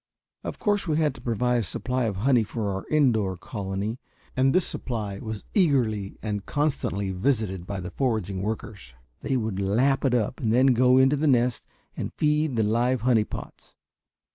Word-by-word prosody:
Of -, -, -5 dB
course 205 Hz, -2 st, 0 dB
we 155 Hz, -2 st, +1 dB
had 150 Hz, -3 st, +2 dB
to -, -, -13 dB
provide 125 Hz, +1 st, +1 dB
a -, -, +2 dB
supply 120 Hz, +5 st, -2 dB
of 105 Hz, -3 st, -1 dB
honey 120 Hz, +5 st, +3 dB
for 110 Hz, -1 st, -3 dB
our 95 Hz, -, -5 dB
indoor 110 Hz, -, +2 dB
colony, 100 Hz, +4 st, -4 dB, 0.4 s
and 130 Hz, +1 st, +3 dB
this 185 Hz, +2 st, +3 dB
supply 105 Hz, -5 st, -3 dB
was 110 Hz, -2 st, -6 dB
eagerly 120 Hz, -, +1 dB
and 105 Hz, -2 st, -2 dB
constantly 130 Hz, -10 st, -1 dB
visited 95 Hz, -3 st, -1 dB
by 100 Hz, -2 st, -4 dB
the 90 Hz, -, -6 dB
foraging 110 Hz, -8 st, -1 dB
workers. 105 Hz, -, -5 dB, 0.3 s
They 135 Hz, -, 0 dB
would 110 Hz, -5 st, -2 dB
lap 125 Hz, +8 st, +2 dB
it 130 Hz, -3 st, +2 dB
up 115 Hz, +1 st, -1 dB
and 110 Hz, -3 st, 0 dB
then 130 Hz, +3 st, +5 dB
go 125 Hz, +1 st, +4 dB
into 135 Hz, +2 st, +4 dB
the 155 Hz, +2 st, +1 dB
nest 125 Hz, -3 st, +2 dB, 0.3 s
and -, -, -4 dB
feed 150 Hz, -2 st, +1 dB
the 110 Hz, -, +2 dB
live 120 Hz, +3 st, +1 dB
honey 115 Hz, -3 st, +3 dB
pots! -, -, -9 dB
115 Hz, 180 wpm, -26 LUFS, 105-130 Hz, 0.4 s, then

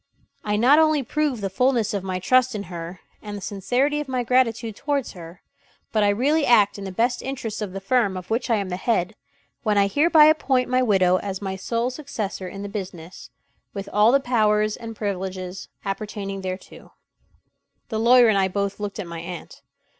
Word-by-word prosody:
I 210 Hz, 0 st, 0 dB
not 255 Hz, +8 st, +5 dB
only 310 Hz, -3 st, +3 dB
prove 285 Hz, -2 st, -1 dB
the 195 Hz, -, -2 dB
fullness 240 Hz, 0 st, +1 dB
of 200 Hz, -2 st, -2 dB
my 185 Hz, -1 st, -3 dB
trust 255 Hz, +6 st, +2 dB
in 205 Hz, -, -3 dB
her 170 Hz, +1 st, -7 dB, 0.2 s
and 210 Hz, -1 st, -6 dB
the -, -, -9 dB
sincerity 245 Hz, +10 st, 0 dB
of 295 Hz, -, -4 dB
my 255 Hz, -2 st, -1 dB
gratitude 230 Hz, -3 st, +1 dB
towards 285 Hz, 0 st, -2 dB
her, 170 Hz, -1 st, -12 dB, 0.5 s
but 220 Hz, -, +1 dB
I 205 Hz, -, +4 dB
really 280 Hz, +10 st, +2 dB
act 210 Hz, -6 st, +4 dB
in 200 Hz, -, -6 dB
the 190 Hz, -, -5 dB
best 235 Hz, +6 st, 0 dB
interests 240 Hz, -5 st, -5 dB
of 205 Hz, -3 st, -4 dB
the 195 Hz, -, -5 dB
firm 200 Hz, -1 st, +1 dB
of 185 Hz, +3 st, -9 dB
which 240 Hz, +3 st, -1 dB
I 230 Hz, -, +4 dB
am 200 Hz, -3 st, -2 dB
the 180 Hz, -, -3 dB
head, 210 Hz, -1 st, 0 dB, 0.5 s
when 210 Hz, -3 st, +1 dB
I 200 Hz, -, +5 dB
hereby 300 Hz, -, +5 dB
appoint 270 Hz, -5 st, +2 dB
my 255 Hz, 0 st, +2 dB
widow 190 Hz, -6 st, +3 dB
as 195 Hz, 0 st, -4 dB
my 190 Hz, -2 st, -4 dB
sole 230 Hz, +6 st, -2 dB
successor 220 Hz, -9 st, -5 dB
in 195 Hz, +2 st, -7 dB
the -, -, -4 dB
business, 185 Hz, -4 st, -8 dB, 0.5 s
with 200 Hz, 0 st, -5 dB
all 210 Hz, +3 st, +5 dB
the 275 Hz, -, +4 dB
powers 215 Hz, -4 st, +1 dB
and 225 Hz, -1 st, -8 dB
privileges 190 Hz, -2 st, -4 dB, 0.2 s
appertaining 195 Hz, -1 st, -4 dB
thereto." 185 Hz, 0 st, -8 dB, 1.0 s
The 220 Hz, -2 st, -2 dB
lawyer 240 Hz, +1 st, +6 dB
and 210 Hz, -3 st, +3 dB
I 190 Hz, -, +3 dB
both 200 Hz, +1 st, -3 dB
looked 205 Hz, -1 st, -5 dB
at 205 Hz, -, -4 dB
my 170 Hz, -1 st, -7 dB
aunt. 170 Hz, 0 st, -8 dB
210 Hz, 200 wpm, -23 LUFS, 195-250 Hz, 1.0 s, lawyer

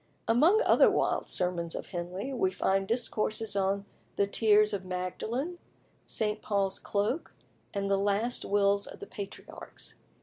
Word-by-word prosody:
Among 325 Hz, -, +5 dB
other -, -, +6 dB
wild -, -, 0 dB
sermons 175 Hz, -2 st, -1 dB
of -, -, -5 dB
Henley, 185 Hz, +8 st, -4 dB
we 190 Hz, -7 st, +1 dB
find 195 Hz, +1 st, 0 dB
discourses 220 Hz, -2 st, 0 dB
on 195 Hz, 0 st, 0 dB, 0.3 s
"The 200 Hz, -, +3 dB
Tears 210 Hz, +1 st, +4 dB
of 195 Hz, -2 st, -2 dB
Magdalen," 220 Hz, -, -3 dB, 0.5 s
"St. 210 Hz, -1 st, 0 dB
Paul's 195 Hz, -2 st, -1 dB
Cloak," 210 Hz, +10 st, -2 dB, 0.4 s
and 200 Hz, -1 st, -2 dB
"The 195 Hz, 0 st, +2 dB
Last 205 Hz, +4 st, 0 dB
Wills 200 Hz, 0 st, +2 dB
of -, -, -10 dB
the -, -, -7 dB
Patriarchs." 200 Hz, -1 st, -9 dB
200 Hz, 140 wpm, -30 LUFS, 195-225 Hz, 0.5 s, other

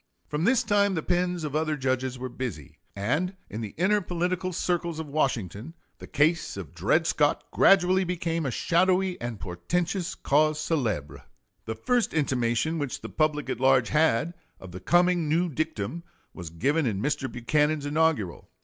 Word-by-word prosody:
From 150 Hz, +3 st, -2 dB
this 245 Hz, +2 st, +3 dB
time 200 Hz, -3 st, +2 dB
the 160 Hz, -, -2 dB
pens 180 Hz, -1 st, 0 dB
of 150 Hz, -1 st, -4 dB
other 155 Hz, -1 st, 0 dB
judges 130 Hz, -1 st, -1 dB
were 130 Hz, +1 st, -4 dB
busy, 120 Hz, -, -6 dB, 0.2 s
and 150 Hz, -, -1 dB
in 110 Hz, -, -5 dB
the 105 Hz, -3 st, -6 dB
inner 205 Hz, +5 st, +2 dB
political 180 Hz, +1 st, -2 dB
circles 170 Hz, -2 st, -1 dB
of 160 Hz, -, -4 dB
Washington 135 Hz, -, -2 dB, 0.2 s
the -, -, -10 dB
case 155 Hz, -, +1 dB
of 90 Hz, -8 st, -8 dB
Dred -, -, +1 dB
Scott -, -, +1 dB
gradually 190 Hz, 0 st, +4 dB
became 170 Hz, -2 st, -2 dB
a 135 Hz, -, -1 dB
shadowy 185 Hz, +7 st, +1 dB
and 120 Hz, -3 st, -4 dB
portentous 170 Hz, -, -2 dB
cause 155 Hz, +2 st, +2 dB
célèbre. 105 Hz, -, -2 dB, 0.4 s
The 110 Hz, -, -4 dB
first 235 Hz, -, 0 dB
intimation 135 Hz, +2 st, 0 dB
which 145 Hz, -3 st, -4 dB
the -, -, -7 dB
public 150 Hz, -1 st, 0 dB
at -, -, -3 dB
large 130 Hz, -2 st, +4 dB
had 155 Hz, 0 st, +2 dB, 0.3 s
of 95 Hz, -, -11 dB
the 90 Hz, -, -7 dB
coming 175 Hz, -, +2 dB
new 170 Hz, +3 st, +2 dB
dictum 155 Hz, -1 st, -3 dB, 0.3 s
was 85 Hz, -3 st, -7 dB
given 140 Hz, -, 0 dB
in 100 Hz, -4 st, -1 dB
Mr. 135 Hz, +2 st, -1 dB
Buchanan's 150 Hz, +4 st, 0 dB
inaugural. 145 Hz, -, 0 dB
155 Hz, 165 wpm, -27 LUFS, 120-175 Hz, 0.4 s, gradually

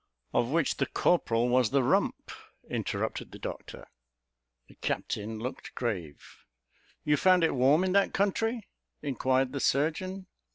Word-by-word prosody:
"Of 120 Hz, -, +2 dB
which 160 Hz, 0 st, +1 dB
the -, -, 0 dB
corporal 120 Hz, -9 st, +2 dB
was 125 Hz, -2 st, +3 dB
the 135 Hz, -1 st, +2 dB
rump," -, -, 0 dB, 0.4 s
interrupted -, -, -3 dB
the -, -, -9 dB
doctor. -, -, -8 dB, 0.8 s
The -, -, -17 dB
captain 110 Hz, +2 st, -3 dB
looked 125 Hz, +5 st, -6 dB
grave. 90 Hz, -, -4 dB, 0.8 s
"You 150 Hz, 0 st, +2 dB
found 185 Hz, +2 st, +4 dB
it 160 Hz, -, +3 dB
warm 140 Hz, +6 st, +4 dB
in 185 Hz, -, 0 dB
that 200 Hz, +1 st, +3 dB
country?" 220 Hz, +3 st, 0 dB, 0.4 s
inquired 130 Hz, -1 st, +1 dB
the 140 Hz, -, -3 dB
surgeon. 185 Hz, +8 st, 0 dB
140 Hz, 135 wpm, -29 LUFS, 125-185 Hz, 0.8 s, found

